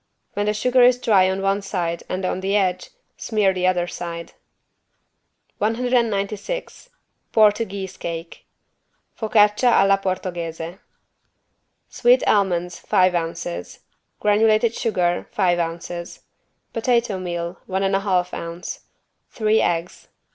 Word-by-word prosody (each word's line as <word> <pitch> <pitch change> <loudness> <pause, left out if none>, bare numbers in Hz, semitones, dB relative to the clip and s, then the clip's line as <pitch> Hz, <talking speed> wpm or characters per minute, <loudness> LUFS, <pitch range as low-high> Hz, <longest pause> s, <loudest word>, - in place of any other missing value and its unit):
When 205 0 -1
the 210 - +2
sugar 250 +4 +3
is 250 0 +6
dry 200 -6 +3
on 190 +1 -2
one 195 +1 +1
side 170 -4 -3
and 185 +1 -2
on 185 - -1
the 195 +2 -1
edge, 185 -3 0 0.3
smear 210 -4 +1
the 180 0 0
other 180 -1 +1
side. 170 -1 -7 1.3
196 230 - -1 0.4
PORTUGUESE 205 -3 +2
CAKE 165 0 -6 0.7
(Focaccia 215 +2 +3
alla 195 -2 +4
Portoghese) 175 -2 -4 1.1
Sweet 245 +2 +3
almonds, 180 -4 +1
five 185 -3 +2
ounces. 165 - -4 0.4
Granulated 215 +2 +3
sugar, 180 -7 0
five 180 -3 +1
ounces. 170 +1 -5 0.5
Potato 235 -4 +1
meal, 175 -1 -4
one 190 +1 -1
and 195 0 +1
a - - +2
half 185 -3 0
ounce. 170 +1 -6 0.5
Three 220 -1 +2
eggs. 170 +1 -2
195 Hz, 115 wpm, -22 LUFS, 175-215 Hz, 1.3 s, is